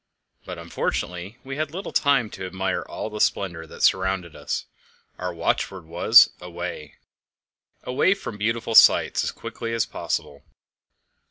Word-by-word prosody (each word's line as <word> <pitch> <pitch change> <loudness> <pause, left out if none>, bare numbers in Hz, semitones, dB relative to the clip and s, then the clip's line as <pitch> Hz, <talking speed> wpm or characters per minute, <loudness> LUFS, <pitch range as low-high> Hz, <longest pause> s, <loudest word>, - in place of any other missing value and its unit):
But - - -7
unfortunately 90 +5 -4
we 135 +1 -6
had 155 -1 -1
little 185 +6 -6
time 135 -7 +2
to 95 -1 -6
admire 95 0 -2
all 110 - -6
the 105 - -4
splendour 85 -4 0
that - - -8
surrounded 95 -3 +1
us; - - -4 0.5
our 90 0 -3
watchword 90 +1 -2
was 85 +8 +6
"Away" 85 -3 -7 0.9
away 135 +10 +2
from 115 - -8
beautiful 115 +2 -1
sights, - - +6
as - - -1
quickly 115 0 -5
as 115 - +1
possible. 70 -1 -4
95 Hz, 140 wpm, -24 LUFS, 90-115 Hz, 0.9 s, was